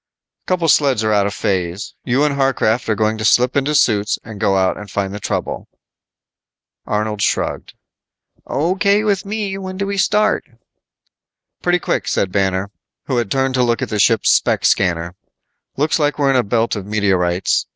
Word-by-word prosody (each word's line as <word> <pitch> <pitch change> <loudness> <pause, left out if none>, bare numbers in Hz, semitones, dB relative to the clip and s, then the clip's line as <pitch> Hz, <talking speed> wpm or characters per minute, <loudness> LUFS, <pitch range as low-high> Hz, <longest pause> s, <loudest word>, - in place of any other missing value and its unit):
"Couple 180 -3 0
sleds 140 -7 +3
are 110 0 +1
out 100 -1 +2
of 100 - -4
phase. 90 -1 -2
You 130 +3 +1
and 150 -1 +1
Harcraft 130 -4 0
are 110 - +2
going 110 +1 0
to - - -3
slip 125 +3 +3
into 140 +2 +1
suits 105 -7 +2
and 110 -3 -10
go 100 -3 +2
out 95 -1 +1
and 105 -1 -10
find 100 +1 -2
the 105 - -5
trouble." - - -4 1.2
Arnold 105 0 -2
shrugged, - - -1 0.7
"O.K. 195 +7 +1
with 200 -2 0
me, 200 -2 -3
when 185 -1 -6
do 200 - -2
we 200 0 -3
start?" 210 +3 +2 1.2
"Pretty 175 0 +2
quick," - - -2
said 95 - 0
Banner, 95 0 0 0.3
who 130 - -1
had 120 -4 -1
turned 135 +3 0
to 130 - +1
look 120 -1 0
at - - -4
the 105 - -2
ship's 110 +2 +3
spec - - +2
scanner. 85 -2 +1 0.6
"Looks 150 +4 +1
like 150 -1 +1
we're 140 -2 +2
in - - +1
a 130 - +4
belt 115 +1 0
of 100 - -5
meteorites. 95 -4 +1
115 Hz, 180 wpm, -18 LUFS, 100-150 Hz, 1.2 s, a